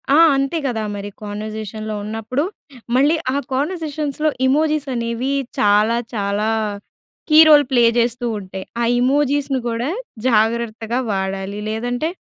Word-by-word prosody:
ఆ! - - +6 0.2
అంతే 275 +4 0
కదా 225 -4 -2
మరి 205 0 -5
కన్వర్జేషన్‌లో 215 +1 -5
ఉన్నప్పుడు. 225 +6 -2 0.5
మళ్ళీ 290 +5 +4 0.2
ఆ - - -1 0.2
కన్వర్జేషన్స్‌లో 305 0 -1 0.2
ఎమోజీస్ 300 +1 +1
అనేవి 235 +3 -2 0.3
చాలా 210 +3 +3 0.2
చాలా 205 0 -1 0.8
కీరోల్ 305 -2 +8
ప్లే 240 -2 +4 0.2
చేస్తూ 240 +1 0
ఉంటాయి. 190 0 -8 0.2
ఆ - - +2 0.2
ఎమోజిస్‌ని 275 0 +1
కూడా 235 +5 -2 0.4
జాగ్రత్తగా 230 +1 +1
వాడాలి. 195 +1 -3
లేదంటే 245 +7 -2
235 Hz, 115 wpm, -20 LUFS, 215-280 Hz, 0.8 s, కీరోల్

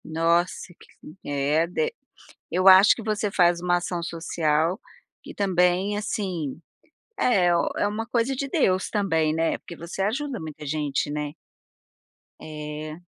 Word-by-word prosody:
Nossa, 170 +3 0
que, 155 - -16
é 145 +3 +1
de 465 - -1 0.6
eu 185 +1 +2
acho 190 +2 +8
que 230 - -8
você 215 -1 -1
faz 175 -3 +3
uma 175 0 +2
ação 175 0 -3
social, 165 +1 -1 0.5
e - - -9
também 185 +1 +1
assim, 180 -9 -3 0.6
é 180 -7 +3
um - - +1
é - - +1
uma 220 +2 -4
coisa 240 +2 0
de 275 +1 -3
Deus 195 - +1
também, 165 -7 +1
né. 165 0 0
Porque 170 - -11
você 170 +4 -5
ajuda 255 +5 -2
muita 155 -1 -8
gente, 145 -1 -1
né. 150 0 -3 1.1
É. 155 +1 -7
175 Hz, 140 wpm, -25 LUFS, 155-205 Hz, 1.1 s, acho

